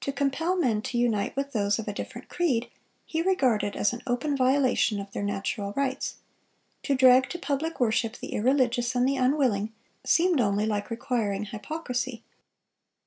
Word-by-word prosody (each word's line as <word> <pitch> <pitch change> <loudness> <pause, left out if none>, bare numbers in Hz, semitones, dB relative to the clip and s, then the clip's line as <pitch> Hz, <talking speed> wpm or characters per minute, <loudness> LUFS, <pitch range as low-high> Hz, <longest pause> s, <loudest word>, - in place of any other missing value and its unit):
To 275 - 0
compel 280 +6 0
men 235 -11 +1
to 240 - -3
unite 230 -4 +1
with 280 +1 -2
those 205 -2 +1
of 225 - -5
a 205 - -2
different - - -7
creed, 265 -10 0 0.3
he 320 - -2
regarded 255 - +1
as 205 - +1
an 240 - -6
open 255 +4 0
violation 260 -5 +2
of 200 0 -7
their - - -4
natural 200 0 -2
rights; 270 0 -2 0.7
to 280 - 0
drag 260 0 +6
to 350 - -4
public 315 +1 -2
worship 225 -1 +1
the - - -7
irreligious 245 0 +1
and 250 +1 +3
the 275 0 +1
unwilling, 250 -6 +1 0.3
seemed 340 -4 +3
only 205 -1 +1
like 210 -1 -2
requiring 225 -4 -1
hypocrisy.... 250 +1 -4
250 Hz, 165 wpm, -27 LUFS, 215-275 Hz, 0.7 s, drag